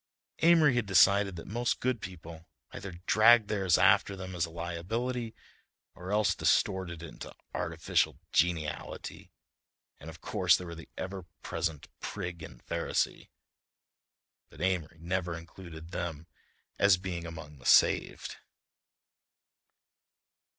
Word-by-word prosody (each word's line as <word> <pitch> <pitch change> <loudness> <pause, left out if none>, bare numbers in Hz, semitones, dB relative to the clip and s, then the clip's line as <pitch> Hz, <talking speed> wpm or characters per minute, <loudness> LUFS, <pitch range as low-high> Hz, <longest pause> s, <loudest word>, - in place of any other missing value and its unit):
Amory 160 -4 +6
had 120 -4 0
decided 100 +1 +5
that 85 - -8
most 120 +3 -1
good 125 -3 -1
people 85 -2 -9 0.2
either 95 -2 -7
dragged 110 0 +6
theirs 95 -5 +2
after 100 - +4
them 95 -1 -7
as 85 -1 -1
a - - -12
liability, 110 +9 -3 0.6
or 90 +2 -8
else 105 -3 +3
distorted 90 -3 +1
it 85 - -10
to - - -9 0.2
artificial - - 0
geniality, 80 -3 -1 0.7
and 75 - -9
of 80 - -11
course - - +3
there 90 - -7
were 85 - -7
the 80 0 -11
ever 95 -2 -5 0.2
present 80 -3 -3
prig 90 -4 -5
and 65 -6 -11
Pharisee—(but - - -1 1.3
Amory 85 -3 -1
never 85 0 -2
included 85 -1 -11
them 80 -3 -4 0.5
as 100 -2 +6
being 90 -2 -5
among 75 -3 -9
the - - -16
saved). - - +3
90 Hz, 120 wpm, -30 LUFS, 85-100 Hz, 1.3 s, Amory